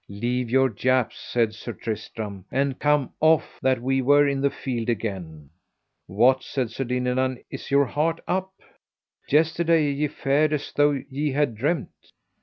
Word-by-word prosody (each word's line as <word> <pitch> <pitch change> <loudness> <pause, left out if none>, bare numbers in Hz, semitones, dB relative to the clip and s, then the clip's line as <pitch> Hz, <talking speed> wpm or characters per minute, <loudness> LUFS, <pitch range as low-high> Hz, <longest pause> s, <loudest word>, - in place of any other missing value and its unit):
Leave 120 +4 -2
your 135 +2 +4
japes, 130 -2 0
said 115 -3 0
Sir 120 +2 -7
Tristram, 105 -3 -6
and 135 -1 0
come 150 -2 +1
off, 160 -1 +2
that 130 -1 +2
[we] 135 +1 +1
were 145 +2 +5
in 140 -1 -1
the 140 - +3
field 120 -4 -4
again. 95 -10 -4 0.6
What, 125 +7 +3
said 130 -5 -3
Sir 135 +3 -3
Dinadan, 125 +1 -1
is - - -7
your 140 0 +4
heart 160 +5 -1
up? 190 +1 -1 0.8
yesterday 160 0 +3
ye 145 +2 0
fared 145 +1 +1
as 145 -1 -3
though 145 -1 +3
ye 145 +1 -2
had 145 -3 +1
dreamed. 140 +7 -1
135 Hz, 155 wpm, -24 LUFS, 120-145 Hz, 0.8 s, were